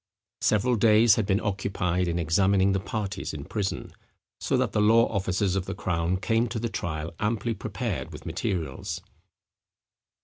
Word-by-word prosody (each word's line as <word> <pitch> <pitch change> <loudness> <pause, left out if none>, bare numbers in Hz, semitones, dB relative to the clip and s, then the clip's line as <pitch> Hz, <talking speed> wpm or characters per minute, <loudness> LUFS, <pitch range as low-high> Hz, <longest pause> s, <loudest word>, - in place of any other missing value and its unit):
Several 110 +3 +2
days 110 +1 +6
had 110 -3 0
been 100 -1 +2
occupied 95 -3 -1
in 85 0 -1
examining 95 +4 +3
the 95 - +1
parties 100 -3 -4
in 70 -1 -7
prison; 100 -3 -3 0.5
so - - 0
that - - +1
the 105 - +1
law 115 +2 +6
officers 95 -1 0
of 95 -2 -2
the 100 - -3
crown 90 -1 0
came 115 +5 +1
to 115 0 -4
the 115 +1 -2
trial 80 -4 -4
amply 115 +2 0
prepared 100 - -4
with 75 0 -10
materials. 85 -4 -3
95 Hz, 160 wpm, -27 LUFS, 90-110 Hz, 0.5 s, days